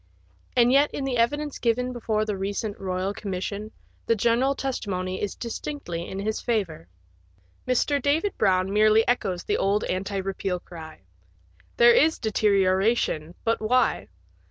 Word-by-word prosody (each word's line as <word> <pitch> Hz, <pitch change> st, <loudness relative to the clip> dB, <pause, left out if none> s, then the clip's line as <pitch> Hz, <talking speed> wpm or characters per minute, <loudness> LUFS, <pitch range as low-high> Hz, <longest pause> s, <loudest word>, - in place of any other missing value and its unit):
And 240 Hz, 0 st, +5 dB
yet 280 Hz, +2 st, +4 dB
in 280 Hz, -, -3 dB
the 265 Hz, -2 st, -1 dB
evidence 290 Hz, +5 st, 0 dB
given 250 Hz, +2 st, 0 dB
before 220 Hz, -3 st, -1 dB
the 210 Hz, -2 st, -2 dB
recent 200 Hz, +2 st, -3 dB
Eoyal 190 Hz, +1 st, -2 dB
Commission 200 Hz, +2 st, -5 dB, 0.4 s
the 230 Hz, -, +3 dB
general 240 Hz, +5 st, +2 dB
testimony 185 Hz, -9 st, -3 dB
is 205 Hz, -, -3 dB
distinctly 230 Hz, -, -5 dB
in 190 Hz, -, -6 dB
his 215 Hz, +2 st, -2 dB
favour. 200 Hz, -, -2 dB, 0.8 s
Mr. 275 Hz, +3 st, +1 dB
David 315 Hz, +9 st, +1 dB
Brown 190 Hz, -1 st, +1 dB
merely 215 Hz, +1 st, +4 dB
echoes 195 Hz, -7 st, 0 dB
the -, -, 0 dB
old 200 Hz, +2 st, +1 dB
anti 195 Hz, +2 st, -2 dB
repeal 190 Hz, -1 st, -2 dB
cry. 160 Hz, -, -11 dB, 0.8 s
There 235 Hz, 0 st, +7 dB
is 315 Hz, +5 st, +4 dB
deterioration, 195 Hz, -5 st, +1 dB
but 230 Hz, -1 st, 0 dB
why? 245 Hz, +3 st, +1 dB
215 Hz, 140 wpm, -25 LUFS, 190-245 Hz, 0.8 s, There